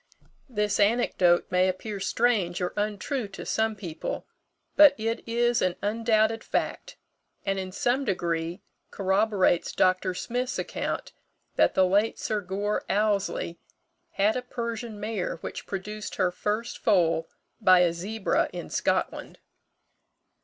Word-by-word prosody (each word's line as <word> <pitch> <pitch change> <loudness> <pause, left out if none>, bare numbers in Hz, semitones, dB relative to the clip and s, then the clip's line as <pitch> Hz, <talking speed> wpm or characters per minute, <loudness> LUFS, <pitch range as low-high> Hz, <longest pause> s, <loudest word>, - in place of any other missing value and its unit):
This 210 -3 0
anecdote 200 -5 +3
may 185 +1 +4
appear 200 +2 -4
strange 195 -4 +1
or 180 -1 -2
untrue 210 +4 -2
to 195 - -9
some 220 0 0
people; 175 -6 -5 0.5
but 295 -2 +8
it 225 +1 -2
is 240 +1 +2
an 180 -1 +1
undoubted 220 +1 +2
fact, - - -3 0.5
and 195 -1 0
in 185 -1 -5
some 245 +7 0
degree 175 -3 -2 0.3
corroborates 195 -2 +2
Dr. 185 0 +2
Smith's 250 +6 -2
account - - -3 0.4
that - - +3
the 190 - +5
late 205 +4 +2
Sir 215 -1 -2
Gore 200 +3 -2
Ouseley 200 -4 0 0.5
had 205 +2 +2
a 255 - -1
Persian 235 -3 -5
mare 210 -3 -2
which - - -6
produced 210 +2 -5
her 185 -2 +1
first 210 +6 -3
foal 165 -4 +2 0.3
by 185 -3 +6
a 175 -2 +3
zebra 200 +5 -1
in - - -7
Scotland. - - -1
205 Hz, 130 wpm, -27 LUFS, 185-225 Hz, 0.5 s, but